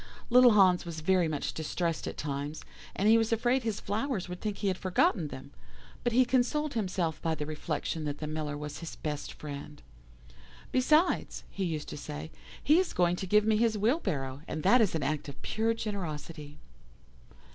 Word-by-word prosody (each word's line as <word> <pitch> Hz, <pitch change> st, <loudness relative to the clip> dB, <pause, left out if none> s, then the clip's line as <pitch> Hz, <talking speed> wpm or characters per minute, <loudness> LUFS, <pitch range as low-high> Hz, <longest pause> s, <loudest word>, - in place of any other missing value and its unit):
Little 250 Hz, -1 st, +8 dB
Hans 185 Hz, -3 st, +5 dB
was 165 Hz, -2 st, -6 dB
very 180 Hz, +1 st, +3 dB
much 150 Hz, -2 st, -2 dB
distressed 165 Hz, +1 st, -2 dB
at -, -, -5 dB
times, 145 Hz, +1 st, -4 dB, 0.3 s
as 195 Hz, -, -1 dB
he 225 Hz, +1 st, +7 dB
was 225 Hz, 0 st, 0 dB
afraid 240 Hz, +3 st, +2 dB
his 225 Hz, -3 st, -2 dB
flowers 215 Hz, -1 st, -2 dB
would 180 Hz, 0 st, -7 dB
think 210 Hz, -2 st, -3 dB
he 205 Hz, -, -2 dB
had 190 Hz, -, +1 dB
forgotten 180 Hz, -3 st, +2 dB
them, 130 Hz, -, -9 dB, 0.5 s
but 240 Hz, -, +1 dB
he 255 Hz, +2 st, +5 dB
consoled 265 Hz, +4 st, +1 dB
himself 180 Hz, -7 st, -1 dB
by 160 Hz, -1 st, 0 dB
the 150 Hz, -, -4 dB
reflection 155 Hz, +1 st, -3 dB
that 145 Hz, -1 st, -3 dB
the 155 Hz, -, -5 dB
Miller 150 Hz, -1 st, -3 dB
was 150 Hz, 0 st, -6 dB
his 165 Hz, -1 st, -7 dB
best 150 Hz, -1 st, -4 dB
friend. 145 Hz, 0 st, -8 dB, 0.9 s
'Besides,' 305 Hz, +7 st, +2 dB
he 195 Hz, -, -2 dB
used 155 Hz, -3 st, -3 dB
to -, -, -6 dB
say, 150 Hz, +2 st, -7 dB, 0.3 s
'he 305 Hz, +4 st, +5 dB
is 375 Hz, -, 0 dB
going 175 Hz, -1 st, +2 dB
to 190 Hz, -, -4 dB
give 210 Hz, +3 st, +4 dB
me 215 Hz, -1 st, +3 dB
his 225 Hz, -1 st, +2 dB
wheelbarrow, 185 Hz, -, -1 dB
and 155 Hz, -, -4 dB
that 240 Hz, +6 st, +6 dB
is 205 Hz, -6 st, +2 dB
an 155 Hz, -, -1 dB
act 150 Hz, +1 st, -2 dB
of 140 Hz, 0 st, -11 dB
pure 225 Hz, +1 st, 0 dB
generosity. 160 Hz, -8 st, -5 dB
180 Hz, 190 wpm, -30 LUFS, 150-225 Hz, 0.9 s, Little